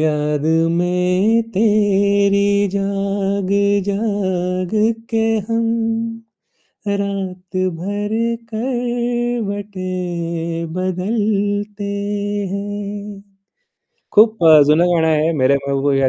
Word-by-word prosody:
याद 150 -1 0 0.3
में 180 +6 +2
तेरी 200 -1 +3 0.3
जाग, 195 0 -1 0.4
जाग 185 -3 -1 0.4
के 225 -1 +1 0.3
हम, 230 0 0 1.2
रातभर 195 0 -3 0.4
करवटे 240 -5 -2 0.9
बदलते 205 +2 -1 0.7
है. 200 0 -2 1.5
खूप 215 -3 +4
अ, 155 -2 +8
जुनं 160 +4 +4
गाणं 160 -1 +2
आहे. 155 +1 +2
मेरे 140 +2 +4
महबूब 140 0 +1
या 135 -1 +3
200 Hz, 70 wpm, -18 LUFS, 180-210 Hz, 1.5 s, अ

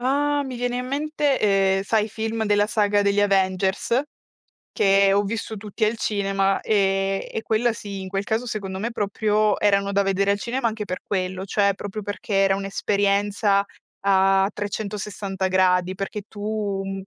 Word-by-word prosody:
Ah 285 +3 +1
mi 260 -2 -6
viene 245 0 -2
in 250 0 -3
mente, 290 0 0
ehm, 195 -2 +3
sai 215 +2 +1
i - - -6
film 220 +1 -3
della 205 -1 +3
saga 205 -2 +2
degli 200 0 +2
Avengers? 195 +3 +1 0.7
Che 195 0 +4
ho 205 - +3
visto 220 +1 -4
tutti 210 +1 -3
al 220 +2 0
cinema, 195 -2 0
e 195 -2 +1
e 220 - -3
quella 235 +2 +1
sì, 200 -3 -7
in 190 - -6
quel 195 +1 -2
caso 220 +4 -1
secondo 195 -4 -4
me 225 +4 -2
proprio 210 -1 +1
erano 200 -1 +2
da 200 - +3
vedere 195 0 +1
al 200 - -1
cinema, 240 +3 -1
anche 215 -1 -4
per 185 -2 -5
quello, 185 -1 -2
cioè 200 0 +2
proprio 205 +2 -6
perché 205 0 -5
era 195 0 +4
un'esperienza 200 +1 +1 0.4
a 195 0 +3
360 200 -2 -4
gradi, 185 0 +2
perché 195 +2 -5
tu 205 -2 -3
200 Hz, 165 wpm, -23 LUFS, 195-220 Hz, 0.7 s, Che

